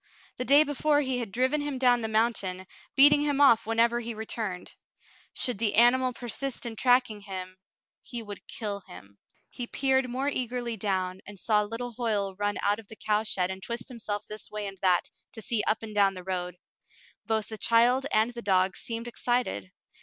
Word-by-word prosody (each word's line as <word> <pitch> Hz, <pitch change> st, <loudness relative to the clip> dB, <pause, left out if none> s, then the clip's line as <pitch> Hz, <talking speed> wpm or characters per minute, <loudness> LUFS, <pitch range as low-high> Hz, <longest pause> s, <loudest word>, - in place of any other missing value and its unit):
The 250 Hz, -, -2 dB
day 285 Hz, +3 st, +7 dB
before 290 Hz, 0 st, +1 dB
he 260 Hz, -3 st, -1 dB
had 230 Hz, -5 st, -4 dB
driven 260 Hz, +7 st, +1 dB
him 290 Hz, -2 st, -3 dB
down 245 Hz, -2 st, +3 dB
the 220 Hz, -, -2 dB
mountain, 215 Hz, -4 st, 0 dB, 0.3 s
beating 290 Hz, +1 st, +7 dB
him 290 Hz, -1 st, 0 dB
off 235 Hz, -6 st, +5 dB
whenever 230 Hz, +1 st, +2 dB
he 235 Hz, -1 st, -5 dB
returned. 215 Hz, -4 st, -4 dB, 0.6 s
Should 245 Hz, -6 st, -2 dB
the 215 Hz, -2 st, 0 dB
animal 255 Hz, +3 st, +5 dB
persist 245 Hz, +2 st, -4 dB
in 230 Hz, -1 st, -5 dB
tracking 245 Hz, -3 st, +2 dB
him, 185 Hz, -2 st, -7 dB, 0.4 s
he 240 Hz, -2 st, -7 dB
would 205 Hz, -2 st, -10 dB
kill 205 Hz, -3 st, -4 dB
him. 100 Hz, +3 st, -13 dB, 0.3 s
He 245 Hz, -2 st, -6 dB
peered 265 Hz, -1 st, +1 dB
more 260 Hz, +3 st, -2 dB
eagerly 245 Hz, -3 st, -2 dB
down, 190 Hz, -3 st, -2 dB
and 205 Hz, 0 st, -10 dB
saw 210 Hz, +2 st, +2 dB
little 230 Hz, +4 st, -4 dB
Hoyle 215 Hz, -5 st, -1 dB
run 205 Hz, +1 st, -1 dB
out 205 Hz, +1 st, +2 dB
of 220 Hz, -, -13 dB
the 220 Hz, -, -10 dB
cow 210 Hz, -1 st, 0 dB
shed 190 Hz, -4 st, 0 dB
and 190 Hz, 0 st, -7 dB
twist 235 Hz, +4 st, -5 dB
himself 215 Hz, -4 st, -5 dB
this 215 Hz, 0 st, -7 dB
way 210 Hz, -1 st, -5 dB
and 195 Hz, -1 st, -8 dB
thai 180 Hz, -2 st, +4 dB, 0.3 s
to 220 Hz, -, -7 dB
see 225 Hz, -1 st, 0 dB
up 220 Hz, -, +1 dB
and 215 Hz, -1 st, -7 dB
down 200 Hz, -2 st, +3 dB
the 185 Hz, -, -8 dB
road. 180 Hz, -1 st, -3 dB, 0.7 s
Both 220 Hz, -1 st, 0 dB
the 220 Hz, -1 st, -7 dB
child 245 Hz, +4 st, +3 dB
and 220 Hz, +2 st, +3 dB
the 235 Hz, -, -6 dB
dog 190 Hz, -2 st, +2 dB
seemed 230 Hz, 0 st, -5 dB
excited. 240 Hz, -, -1 dB
225 Hz, 190 wpm, -28 LUFS, 200-245 Hz, 0.7 s, day